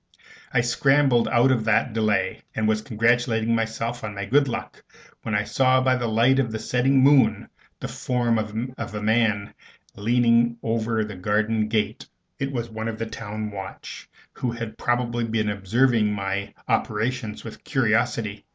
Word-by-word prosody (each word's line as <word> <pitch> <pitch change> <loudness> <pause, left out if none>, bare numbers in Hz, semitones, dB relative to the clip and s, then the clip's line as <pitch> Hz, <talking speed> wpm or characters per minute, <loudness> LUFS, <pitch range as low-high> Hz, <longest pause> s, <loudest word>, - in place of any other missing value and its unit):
I - - +3
scrambled 135 0 +3
out 125 +3 +3
of 115 -4 0
that 110 +2 +2
without - - -12
delay, 105 -4 0
and 110 -1 0
was 110 0 +1
congratulating 115 -1 +1
myself 115 +1 -2
on 105 -1 -5
my 100 0 -4
good 140 +6 +3
luck, 120 - -6 0.4
when 110 - -3
I 105 - +2
saw 130 +5 +3
by 130 0 +2
the 120 -2 -2
light 120 +4 +3
of 120 -4 0
the 110 - -3
setting 125 +4 +2
moon 130 -7 +4 0.3
the - - -4
form 120 -3 0
of 110 +1 -5
a 105 - -4
man 110 -2 +1 0.4
leaning 120 +2 +2
over 115 -1 0
the 105 - -7
garden 105 +3 0
gate. 110 -1 -2 0.3
It 140 0 -2
was 120 -3 -3
one 110 0 -5
of 115 -1 -4
the 115 - -3
town 110 -1 -6
watch, 95 -1 -8 0.2
who 125 - -3
had 115 -2 -6
probably 120 -1 0
been 110 -2 -1
observing 105 +2 +2
my 100 -1 -3
operations 110 0 -1
with - - -10
curiosity. - - 0
115 Hz, 165 wpm, -24 LUFS, 110-120 Hz, 0.4 s, moon